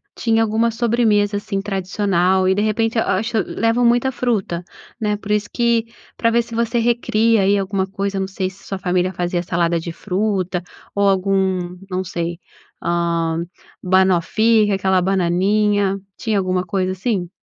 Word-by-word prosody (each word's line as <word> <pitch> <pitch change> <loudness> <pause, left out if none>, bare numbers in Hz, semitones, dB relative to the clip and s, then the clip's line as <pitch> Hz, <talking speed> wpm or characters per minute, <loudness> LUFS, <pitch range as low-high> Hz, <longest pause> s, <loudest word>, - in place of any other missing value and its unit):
tinha 225 -1 +1
alguma 225 +1 +1
sobremesa, 220 -3 +2
assim, 200 -1 -3
tradicional. 190 -1 +1
E, 190 - +3
de 205 - +1
repente, 225 +2 0
eu 225 - +3
acho, 220 +4 -1
leva 230 +2 0
muita 240 +2 +3
fruta, 210 -9 -1 0.4
né. 210 -1 0
Por 210 0 -6
isso 210 0 0
que 235 -1 +1 0.3
pra 230 - +1
ver 235 +1 +3
se 230 0 -9
você 235 +1 0
recria 230 -2 +2
aí 200 +1 +3
alguma 195 -1 -1
coisa, 195 0 -3
não 190 - -1
sei, 190 -1 -3
se 190 +1 -18
sua 195 - -5
família 180 0 0
fazia 175 0 -2
salada 170 -1 0
de 170 +1 -6
fruta, 185 -1 -2 0.3
ou 200 0 +3
algum, 190 -2 0
não 185 +1 -1
sei, 170 -1 -4 0.4
hã, 170 -1 0 0.4
banoffee, 190 +4 +3
que - - 0
é - - +2
aquela 190 -1 +2
bananinha. 195 +2 +1 0.2
Tinha 220 -3 -1
alguma 185 -1 0
coisa 185 +1 -1
assim? 190 -2 -2
195 Hz, 165 wpm, -20 LUFS, 185-220 Hz, 0.4 s, E